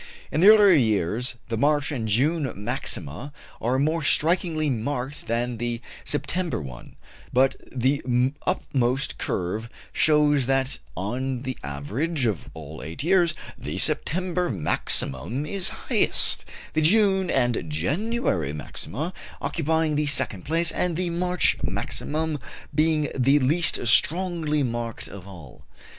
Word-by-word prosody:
In 155 - 0
the 190 - +7
earlier 210 -2 +8
years 110 - +1
the 115 - -1
March 145 +4 +2
and 120 -6 -3
June 135 +6 +1
maxima 105 - -3 0.3
are 125 +3 +1
more 155 +4 +1
strikingly 160 +1 +2
marked 130 +2 -3
than 120 +1 -1
the 120 0 -2 0.2
September 165 +4 -1
one; 65 -5 -10 0.4
but 130 +1 +3 0.2
the 130 +3 +1 0.5
uppermost 130 +1 0
curve 105 +6 -3 0.2
shows 150 -4 +3
that 135 0 0 0.2
on 125 +6 -3
the 130 -1 -3
average 115 - -2
of 105 -8 -2
all 80 -1 -9
eight 80 - -6
years 170 -2 +3 0.2
the - - -5
September 180 +2 +1
maximum 90 - 0
is 190 +3 +1
the - - -8
highest, - - +1 0.3
the 155 - +1
June 190 +1 +4
and 120 - 0
January 95 - -1
maxima 75 - -5 0.3
occupying 160 0 0
the 150 0 +1
second 120 -9 +2
place, 165 +2 +2
and 175 -3 -1
the 180 -1 -1
March 180 +1 +1
maximum 155 0 -2 0.3
being 155 -1 +2
the 135 +2 +4
least 150 +2 +2
strongly 160 +3 +2
marked 120 -2 -4
of 100 -1 -11
all. 85 -9 -12
135 Hz, 130 wpm, -25 LUFS, 115-160 Hz, 0.5 s, earlier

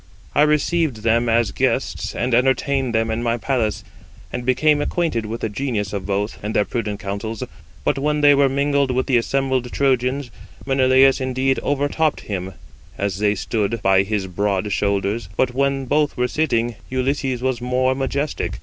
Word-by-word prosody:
I - - +3
received 150 -4 +1
them 115 +1 +2
as 115 -3 +2
guests, - - -1
and 120 +1 -1
entertained 130 0 +1
them 115 0 +1
in 110 +1 -2
my 120 0 0
palace, 120 -4 -1 0.5
and 125 - -3
became 145 +4 +3
acquainted 145 -9 -1
with 115 +2 -5
the - - 0
genius 105 -3 -3
of 100 -2 -4
both, 100 +2 -2
and 105 +2 -4
their 105 - +3
prudent 105 -4 -3
counsels; 100 +2 -4 0.4
but 135 - 0
when 150 +1 0
they 145 0 +7
were 140 -1 +4
mingled 140 0 +1
with 130 0 0
the 130 -3 +3
assembled 130 0 0
Trojans, 130 -1 0 0.3
Menelaus 135 0 +4
indeed 130 +1 0
overtopped 145 +2 0
him, 95 -2 -5 0.4
as 100 -1 -2
they 105 0 +2
stood 110 +2 -1
by 95 0 +5
his 100 0 -2
broad 100 +2 -1
shoulders; 100 +3 -1
but 125 -1 +1
when 135 0 0
both 145 +2 +1
were 125 0 +1
sitting, 120 -7 0
Ulysses 130 -1 -1
was 130 -2 -1
more 130 +1 +1
majestic. 135 - -2
125 Hz, 170 wpm, -21 LUFS, 110-135 Hz, 0.5 s, they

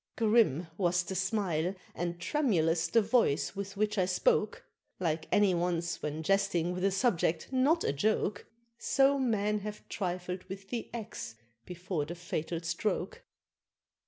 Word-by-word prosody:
Grim 215 - +3
was 175 -1 +2
the 185 - -5
smile, 190 -2 0 0.2
and 175 0 -3
tremulous 175 - +1
the 230 -1 +3
voice 205 - +2
with 200 0 -5
which 210 0 +1
I 180 - +2
spoke, 460 - +1 0.3
Like 160 -3 -1
any 205 -2 +4
one's 170 -1 -1
when 150 +1 -3
jesting 185 -2 +1
with 180 +1 -4
a 195 - +4
subject 190 -6 +1
not 285 +6 +3
a - - +1
joke, 205 +5 0 0.3
So 275 0 +3
men 210 -4 +1
have 210 +1 -7
trifled 180 -1 -3
with 195 +1 -9
the 240 -2 -3
axe 225 - -6 0.3
before 180 -3 -3
the 170 +4 -6
fatal 170 -1 -3
stroke. 175 +3 -2
190 Hz, 145 wpm, -31 LUFS, 170-210 Hz, 0.3 s, any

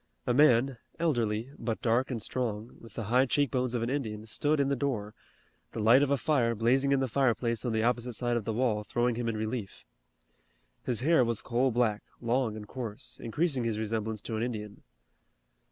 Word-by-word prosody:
A - - +1
man, 130 -2 +4 0.2
elderly, 120 -7 0
but 115 -2 -2
dark 120 +3 +2
and 125 -4 -2
strong, 115 -1 -3
with 115 -3 -14
the 115 - -3
high 125 +6 +3
cheek 145 0 +1
bones 125 -1 0
of 115 - 0
an 115 - -1
Indian 110 -6 -3
stood 145 +7 0
in 140 - +3
the 140 - +1
door, 120 -7 -2 0.6
the - - -4
light 115 +5 +6
of 145 - +2
a 140 - +3
fire 125 -5 +1
blazing 130 +5 +2
in 135 -1 +3
the 135 - +1
fireplace 120 -3 +1
on 120 - 0
the 110 0 +1
opposite 120 +1 0
side 120 +2 -1
of 120 - -1
the 110 - -2
wall 110 -2 0
throwing 120 +3 0
him 115 0 -2
in 110 - -2
relief. 110 -2 -4 1.0
His 120 -2 -2
hair 160 0 +4
was 115 -2 -2
coal 125 +2 +1
black, 115 -3 +1 0.2
long 120 -2 0
and 105 -1 -8
coarse, 120 0 -7
increasing 135 +2 0
his 115 -2 -1
resemblance 110 -1 -3
to 110 - -4
an 110 - -2
Indian. 105 -4 -4
120 Hz, 200 wpm, -30 LUFS, 110-130 Hz, 1.0 s, light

